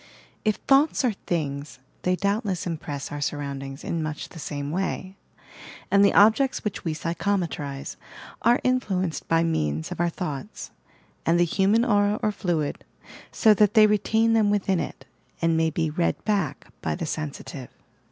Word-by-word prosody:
If 215 -1 +2
"thoughts 275 0 +3
are 245 - +3 0.2
things," 145 -4 -2 0.2
they 180 0 +1
doubtlefis 200 -2 -1
impress 150 -4 -5
our 145 0 -5
surroundings 140 -1 -4
in 165 - -2
much 155 -1 -4
the 165 - -11
same 145 -1 -4
way: 190 +1 -3 0.8
and 200 0 +6
the 200 - +4
objects 225 +6 +4
which 210 -4 -3
we 160 -2 -2
psychometrize 165 -5 -2 0.4
are 240 +1 +4
influenced 195 -10 0
by 165 0 +3
means 80 - -1
of - - -6
our 175 0 +2
thoughts, 165 +1 -6 0.5
and 170 +1 +3
the 175 - +5
human 200 +7 +2
aura 205 -2 +2
or 215 - +2
fluid, 175 -7 -2 0.5
so 220 - +5
that 210 +1 +3
they 215 -1 +8
retain 220 +2 +2
them 220 -2 +4
within 195 -3 +1
it, - - -6 0.3
and 165 -1 +2
may 160 0 +2
be 160 0 -1
"read 170 +2 -1
back" 195 -10 -1 0.2
by - - -1
the 170 - -4
seuffltive. 150 -3 -5
175 Hz, 160 wpm, -25 LUFS, 155-205 Hz, 0.8 s, they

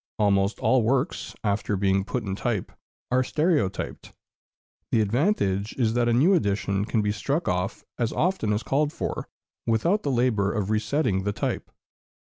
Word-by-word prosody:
Almost 100 -1 +2
all 130 -1 +3
works, 125 +5 -1
after 105 -1 0
being 95 0 +2
put 125 +3 -3
in 95 -2 -3
type, 110 -2 -2 0.4
are 130 +1 +3
stereotyped; 150 - -1 0.7
the 115 - +2
advantage 105 - +1
is 115 -4 +1
that 120 0 +2
a - - +3
new 150 +11 +5
edition 100 - +1
can 110 -1 0
be 105 - +1
struck 140 +10 -1
off 90 +2 -1 0.2
as 120 -1 +1
often 175 - 0
as 105 +2 0
called 145 +3 +1
for, - - -4 0.4
without 170 - +2
the 145 - -2
labor 120 -6 +2
of 105 -2 -2
resetting 110 -1 +1
the 105 +1 -1
type. - - -3
110 Hz, 160 wpm, -25 LUFS, 100-130 Hz, 0.7 s, new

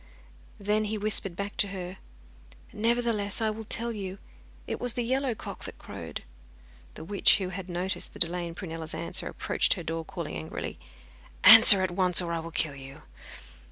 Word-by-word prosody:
Then 210 +2 0
he 215 +1 -3
whispered 205 -3 0
back 200 +2 -5
to 205 - +2
her: 185 -1 -7 0.8
'Nevertheless, 225 -2 0
I 220 -1 0
will 220 +1 -8
tell 235 +3 -1
you. 195 -3 -6 0.5
It - - -5
was 245 -2 0
the 245 -1 -2
yellow 260 0 -1
cock - - -9
that - - -8
crowed.' - - -8 0.7
The - - -9
witch, 200 +4 +4
who 190 -3 -4
had 190 0 -7
noticed 180 +2 -3
the - - -11
delay 175 0 +1
in 165 - -9
Prunella's 165 -3 -7
answer, 175 +1 -1
approached - - 0
her 180 - -7
door 165 0 -4
calling 80 - -7
angrily: 80 -1 -6 0.6
'Answer 215 -3 +10
at 185 - -1
once, 180 -1 +2
or 170 -2 -3
I 165 - -2
will 165 +1 -7
kill 160 -3 -1
you. 135 0 -12
190 Hz, 180 wpm, -27 LUFS, 170-215 Hz, 0.8 s, Answer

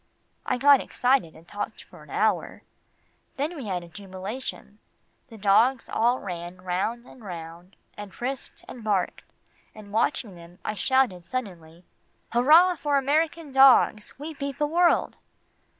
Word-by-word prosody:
I - - +1
got 280 +1 +6
excited, 250 -10 0
and 165 +2 -17
talked 205 - -6
for - - -16
an - - -16
hour. - - -1 0.7
Then 300 +5 -2
we 270 -8 -7
had 180 -3 -2
a - - -12
jubilation. 200 +4 -8 0.5
The 230 -4 -13
dogs 225 +5 +3
all 240 +3 +2
ran 175 -1 -7
round 190 +7 -2
and 255 -2 -15
round, 175 0 -9 0.2
and 205 -1 -9
frisked 260 +5 -5
and 240 - -10
barked, 200 -4 -1 0.5
and 205 -2 -12
watching 220 -2 0
them, 170 0 -14
I 215 - -1
shouted 215 -7 +1
suddenly, 175 -7 -6 0.5
"Hurrah 320 +9 +5
for 290 -1 +1
American 305 +2 0
dogs 265 -5 +5
we 305 +4 -7
beat 280 -1 -5
the 295 - +1
world!" 340 +3 +2
225 Hz, 145 wpm, -26 LUFS, 185-275 Hz, 0.7 s, got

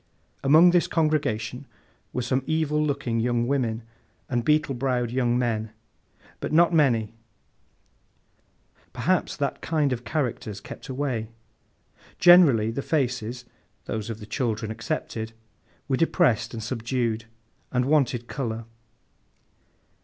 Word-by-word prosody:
Among 160 +6 +7
this 175 -1 +3
congregation, 145 -5 -1 0.4
were 125 - -2
some 130 +2 0
evil 155 -1 +1
looking 140 -6 -1
young 120 0 +1
women, 120 -4 -1 0.4
and 120 -2 -1
beetle 150 0 +2
browed 125 -2 -1
young 120 -1 +1
men; 110 -3 -1 0.7
but - - -4
not 170 +2 +5
many—perhaps 115 -7 -4
that - - -2
kind 150 -5 +1
of 120 -1 -5
characters 120 -8 -3
kept 120 - -10
away. 130 -4 -2 0.9
Generally, 150 -12 +6
the 140 - -3
faces 125 -5 -2 0.4
(those 110 0 -4
of 110 -1 -5
the 105 - -9
children 110 -2 -2
excepted) 110 0 -4 0.5
were 135 -2 +1
depressed 160 - +2
and 110 - -5
subdued, 115 -1 -2 0.5
and 125 0 +1
wanted 130 -5 +1
colour. 115 -5 -4
125 Hz, 115 wpm, -25 LUFS, 115-145 Hz, 0.9 s, Among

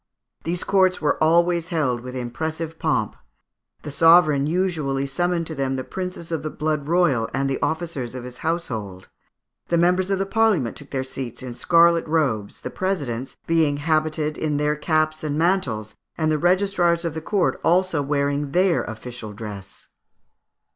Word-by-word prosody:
These 175 +1 -2
courts 185 -2 +3
were 150 0 +1
always 170 +1 +3
held 145 -9 0
with 125 +1 -8
impressive 160 +6 -4
pomp. 115 -10 0 0.7
The 150 - -6
sovereign 155 -2 +5
usually 155 -6 0
summoned 170 +4 -1
to 160 - -5
them 135 -2 -1
the 130 - -3
princes 180 -1 -6
of 165 - -1
the 155 - -3
blood 150 -2 -2
royal 165 -9 +2
and 135 0 0
the 135 - -2
officers 145 -5 -2
of 125 - -6
his 125 0 -9
household; 110 - -3 0.6
the 170 - +1
members 180 +2 +2
of 195 - +1
the 195 - -1
Parliament 200 - +2
took 145 - -12
their 130 -1 -2
seats 130 -2 -6
in 125 -2 -6
scarlet 170 +4 +4
robes, 135 -11 -1
the - - -5
presidents 135 -10 -3
being 160 -3 +2
habited 155 0 0
in 150 -2 0
their 150 +1 +1
caps 155 +1 0
and 150 -2 -2
their 165 - +4
mantles, 110 - -1 0.2
and 155 -1 +1
the 155 - +1
registrars 175 -1 +2
of 165 - -2
the 160 - -5
court 195 +3 0
also 175 -2 +2
wearing 140 0 -1
their 185 -1 +3
official 115 0 -7
dress. 100 -2 -9
155 Hz, 170 wpm, -23 LUFS, 135-170 Hz, 0.7 s, sovereign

